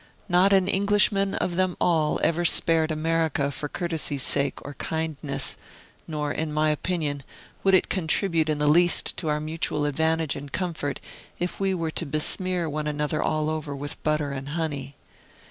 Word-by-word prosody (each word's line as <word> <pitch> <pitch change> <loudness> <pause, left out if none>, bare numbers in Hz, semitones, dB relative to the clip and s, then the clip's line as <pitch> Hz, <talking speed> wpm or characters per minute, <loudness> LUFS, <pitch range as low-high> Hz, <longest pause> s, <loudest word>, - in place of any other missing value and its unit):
Not 185 +1 +4
an 190 -2 +4
Englishman 200 0 +3
of 175 -1 -2
them 185 -1 +1
all 160 -3 +2
ever 170 +1 +2
spared 165 -1 +4
America 155 -2 0
for 145 +1 -4
courtesy's 160 -6 -1
sake 140 0 +1
or 145 - -6
kindness; 150 -2 -3 0.5
nor, 150 -2 -2
in 160 0 -2
my 155 0 +2
opinion, 150 -3 -2 0.4
would 195 -1 +5
it 185 - +3
contribute 165 -2 0
in 155 - +1
the 150 - 0
least 175 +3 +4
to 165 - -3
our 150 0 +1
mutual 155 -1 -2
advantage 160 +1 +1
and 140 0 -8
comfort 165 -6 -3 0.4
if 175 +1 -3
we 195 -1 +1
were 165 -2 -2
to 165 - -3
besmear 170 +4 +1
one 150 0 -3
another 150 0 -1
all 155 0 0
over 155 -2 -3
with 145 +1 -5
butter 150 -2 0
and 135 0 -5
honey. 145 -4 -3
155 Hz, 165 wpm, -25 LUFS, 150-175 Hz, 0.5 s, would